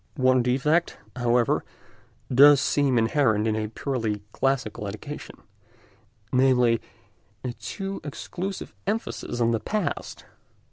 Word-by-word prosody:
One 130 Hz, -1 st, +4 dB
defect, 135 Hz, +7 st, +1 dB, 0.2 s
however, 120 Hz, -1 st, +2 dB, 0.7 s
does 140 Hz, +2 st, +8 dB
seem 140 Hz, -2 st, +2 dB
inherent 115 Hz, -2 st, +2 dB
in 110 Hz, -1 st, +1 dB
a 110 Hz, 0 st, -2 dB
purely 110 Hz, -3 st, -3 dB
classical 125 Hz, -6 st, -1 dB
education—namely, 115 Hz, +1 st, -2 dB, 0.6 s
a 125 Hz, -, -2 dB
too 195 Hz, -, -6 dB
exclusive 180 Hz, -, -5 dB
emphasis 215 Hz, -, -3 dB
on 115 Hz, -1 st, +3 dB
the 115 Hz, -, +1 dB
past. 215 Hz, -, -3 dB
125 Hz, 100 wpm, -25 LUFS, 110-140 Hz, 0.7 s, does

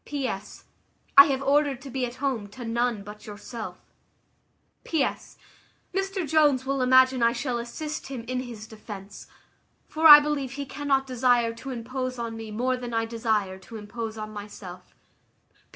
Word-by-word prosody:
"P.S. 265 Hz, -9 st, -5 dB, 0.5 s
I 280 Hz, -, +11 dB
have 275 Hz, -1 st, -1 dB
ordered 280 Hz, -1 st, +2 dB
to 275 Hz, -, -8 dB
be 255 Hz, -1 st, -1 dB
at 240 Hz, -, -9 dB
home 255 Hz, -7 st, -2 dB
to 240 Hz, +4 st, -9 dB
none 235 Hz, -2 st, -1 dB
but 210 Hz, +1 st, -11 dB
yourself. 215 Hz, +2 st, -7 dB, 1.1 s
"P.S. 310 Hz, -5 st, -2 dB, 0.6 s
Mr 390 Hz, -2 st, -2 dB
Jones 290 Hz, -4 st, +3 dB
will 275 Hz, 0 st, -1 dB
imagine 260 Hz, 0 st, +5 dB
I 235 Hz, 0 st, +4 dB
shall 245 Hz, 0 st, -2 dB
assist 300 Hz, +6 st, -5 dB
him 260 Hz, -4 st, -6 dB
in 250 Hz, +2 st, -3 dB
his 235 Hz, -4 st, -7 dB
defence; 210 Hz, -2 st, -10 dB, 0.6 s
for 320 Hz, +1 st, +3 dB
I 295 Hz, -1 st, +13 dB
believe 290 Hz, -3 st, -2 dB
he 280 Hz, 0 st, -5 dB
cannot 275 Hz, -1 st, 0 dB
desire 245 Hz, -2 st, +2 dB
to 230 Hz, +4 st, -9 dB
impose 255 Hz, +1 st, -4 dB
on 230 Hz, -1 st, -4 dB
me 225 Hz, -1 st, -7 dB
more 250 Hz, +4 st, -1 dB
than 240 Hz, -2 st, -5 dB
I 225 Hz, 0 st, +1 dB
desire 220 Hz, -4 st, -1 dB
to 220 Hz, +4 st, -10 dB
impose 220 Hz, +1 st, -6 dB
on 215 Hz, 0 st, -6 dB
myself. 200 Hz, -3 st, -10 dB
245 Hz, 160 wpm, -26 LUFS, 225-270 Hz, 1.1 s, I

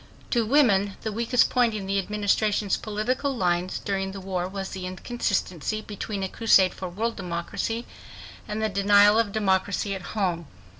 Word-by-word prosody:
To 235 Hz, -3 st, +2 dB
women 205 Hz, -8 st, +3 dB
the 220 Hz, -, -2 dB
weakest 235 Hz, +2 st, +2 dB
point 240 Hz, -3 st, +2 dB
in 200 Hz, -2 st, -4 dB
the 195 Hz, +1 st, 0 dB
Administration's 210 Hz, 0 st, +1 dB
political 250 Hz, +6 st, -2 dB
lines 180 Hz, -1 st, 0 dB
during 195 Hz, -1 st, -3 dB
the 195 Hz, -, -6 dB
war 185 Hz, -2 st, -3 dB
was 195 Hz, 0 st, -5 dB
the 185 Hz, -1 st, -5 dB
inconsistency 200 Hz, -, -2 dB
between 205 Hz, -1 st, -5 dB
a -, -, 0 dB
crusade 190 Hz, -3 st, +4 dB
for 185 Hz, -, -6 dB
world 225 Hz, +6 st, -2 dB
democracy 180 Hz, +6 st, -3 dB, 0.6 s
and 215 Hz, +1 st, -3 dB
the -, -, +3 dB
denial 205 Hz, +2 st, +5 dB
of 225 Hz, -3 st, +1 dB
democracy 200 Hz, -1 st, 0 dB
at 190 Hz, -, -5 dB, 0.2 s
home. 175 Hz, -5 st, -1 dB
200 Hz, 160 wpm, -25 LUFS, 190-220 Hz, 0.6 s, denial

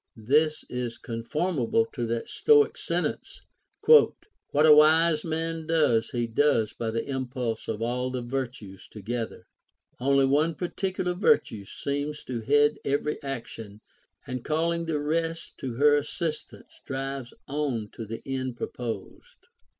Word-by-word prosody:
This 150 Hz, +8 st, +2 dB
is 125 Hz, -1 st, -4 dB
conformable 150 Hz, -, -1 dB
to 120 Hz, -4 st, -2 dB
that 115 Hz, 0 st, -2 dB
Stoic 435 Hz, -1 st, +4 dB
sentence, -, -, -3 dB, 0.2 s
'' -, -, -31 dB
What 425 Hz, -, +4 dB
a 155 Hz, -, +9 dB
wise 155 Hz, +1 st, +5 dB
man 165 Hz, 0 st, -3 dB
does 150 Hz, -9 st, +2 dB
he 120 Hz, -1 st, -1 dB
does 115 Hz, -2 st, +2 dB
by 115 Hz, -, -3 dB
the 115 Hz, +1 st, -2 dB
impulse 125 Hz, -4 st, -3 dB
of 110 Hz, 0 st, -3 dB
all 125 Hz, +2 st, -1 dB
the 125 Hz, -1 st, -4 dB
virtues 120 Hz, -6 st, -5 dB
together; 115 Hz, +2 st, -5 dB, 0.5 s
only 135 Hz, +1 st, +3 dB
one 150 Hz, +4 st, +2 dB
particular 180 Hz, +1 st, -2 dB
virtue 175 Hz, -, +2 dB
seems 145 Hz, +6 st, -4 dB
to 120 Hz, -3 st, -4 dB
head 145 Hz, +5 st, +3 dB
every 145 Hz, +2 st, -1 dB
action, 115 Hz, -6 st, -7 dB, 0.4 s
and 125 Hz, -1 st, -5 dB
calling 165 Hz, +2 st, 0 dB
the 155 Hz, -2 st, 0 dB
rest 165 Hz, +2 st, -2 dB
to 125 Hz, -3 st, -4 dB
her 145 Hz, +3 st, +5 dB
assistance 155 Hz, +1 st, -5 dB
drives 135 Hz, -2 st, -4 dB, 0.2 s
on 135 Hz, -7 st, -2 dB
to 115 Hz, -, -6 dB
the 115 Hz, +2 st, -6 dB
end 130 Hz, -2 st, -3 dB
proposed." 125 Hz, -, -6 dB
135 Hz, 135 wpm, -27 LUFS, 120-155 Hz, 0.5 s, a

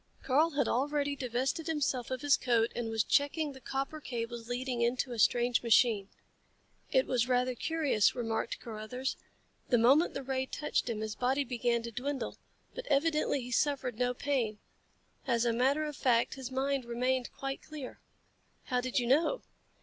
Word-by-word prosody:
Karl 300 Hz, +5 st, +3 dB
had 280 Hz, -4 st, +2 dB
already 285 Hz, +2 st, 0 dB
divested 260 Hz, +4 st, -2 dB
himself 280 Hz, -6 st, -1 dB
of 260 Hz, -1 st, -3 dB
his 290 Hz, -1 st, +5 dB
coat 235 Hz, -2 st, +1 dB
and 235 Hz, -2 st, -2 dB
was 225 Hz, -1 st, +1 dB
checking 290 Hz, +1 st, +1 dB
the 265 Hz, -1 st, -12 dB
copper 275 Hz, +4 st, -3 dB
cables 235 Hz, -2 st, -5 dB
leading 245 Hz, 0 st, -2 dB
into 245 Hz, +2 st, 0 dB
a 235 Hz, -, -5 dB
strange 240 Hz, +2 st, +3 dB
machine. 225 Hz, -4 st, +3 dB, 0.8 s
"It 260 Hz, -, +4 dB
was 245 Hz, -2 st, +1 dB
rather 250 Hz, 0 st, +2 dB
curious," 290 Hz, -6 st, +1 dB
remarked 230 Hz, -2 st, -2 dB
Carruthers. 230 Hz, +4 st, -4 dB, 0.5 s
"The 245 Hz, -, +5 dB
moment 270 Hz, +9 st, +4 dB
the 275 Hz, -, -3 dB
ray 265 Hz, 0 st, -2 dB
touched 300 Hz, -4 st, -1 dB
him 220 Hz, -2 st, -2 dB
his 215 Hz, -1 st, -3 dB
body 260 Hz, +5 st, +1 dB
began 240 Hz, -2 st, 0 dB
to 235 Hz, -, -5 dB
dwindle. 260 Hz, +1 st, -4 dB, 0.3 s
But -, -, -7 dB
evidently 305 Hz, -, +2 dB
he 250 Hz, 0 st, -7 dB
suffered 260 Hz, -3 st, 0 dB
no 250 Hz, 0 st, +1 dB
pain. 245 Hz, -7 st, -1 dB, 0.7 s
As 235 Hz, 0 st, +2 dB
a 235 Hz, -, +2 dB
matter 270 Hz, +6 st, +2 dB
of 300 Hz, -1 st, -5 dB
fact 240 Hz, -3 st, +2 dB
his 265 Hz, -2 st, -6 dB
mind 270 Hz, 0 st, 0 dB
remained 250 Hz, +1 st, -1 dB
quite 270 Hz, 0 st, -4 dB
clear." 300 Hz, -5 st, -8 dB, 0.6 s
"How 250 Hz, -1 st, 0 dB
did 255 Hz, 0 st, -2 dB
you 245 Hz, -, +2 dB
know?" 315 Hz, -, +2 dB
255 Hz, 170 wpm, -31 LUFS, 235-280 Hz, 0.8 s, his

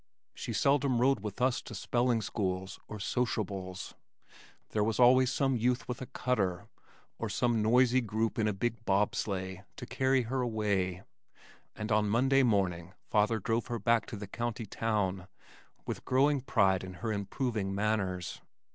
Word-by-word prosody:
She -, -, -5 dB
seldom 140 Hz, -3 st, +2 dB
rode 135 Hz, 0 st, +3 dB
with 105 Hz, +1 st, -6 dB
us 130 Hz, -1 st, +2 dB
to 115 Hz, -, -9 dB
spelling 120 Hz, +2 st, +1 dB
schools 95 Hz, -2 st, -3 dB
or 105 Hz, -, -6 dB
"soshybles." 100 Hz, -4 st, -3 dB, 0.8 s
There 105 Hz, -, +1 dB
was 110 Hz, +2 st, -1 dB
always 130 Hz, +1 st, +6 dB
some 135 Hz, -1 st, +1 dB
youth 125 Hz, +2 st, 0 dB
with 125 Hz, 0 st, -5 dB
a 130 Hz, -, -5 dB
cutter, 100 Hz, -7 st, -1 dB, 0.5 s
or -, -, -2 dB
some 120 Hz, -2 st, +1 dB
noisy 125 Hz, +3 st, +4 dB
group 110 Hz, 0 st, -1 dB
in 110 Hz, -, +2 dB
a -, -, +2 dB
big 115 Hz, +3 st, -2 dB
bob 100 Hz, -1 st, +2 dB
sleigh 95 Hz, -2 st, -3 dB
to -, -, -7 dB
carry 130 Hz, +1 st, +1 dB
her 130 Hz, +3 st, -2 dB
away, 100 Hz, -6 st, -1 dB, 0.7 s
and 105 Hz, +1 st, -5 dB
on 105 Hz, 0 st, +3 dB
Monday 135 Hz, +5 st, +4 dB
morning 95 Hz, -6 st, 0 dB, 0.2 s
father 105 Hz, +2 st, +3 dB
drove 115 Hz, +5 st, -1 dB
her 120 Hz, -2 st, -2 dB
back 115 Hz, +1 st, +2 dB
to -, -, -6 dB
the 105 Hz, -, -6 dB
county 120 Hz, +2 st, -4 dB
town 100 Hz, -4 st, -1 dB, 0.6 s
with -, -, -5 dB
growing 140 Hz, +2 st, +3 dB
pride 100 Hz, -7 st, +2 dB
in 95 Hz, -1 st, -8 dB
her 110 Hz, -, 0 dB
improving 100 Hz, -1 st, -2 dB
manners. 100 Hz, -4 st, -1 dB
110 Hz, 160 wpm, -31 LUFS, 100-125 Hz, 0.8 s, always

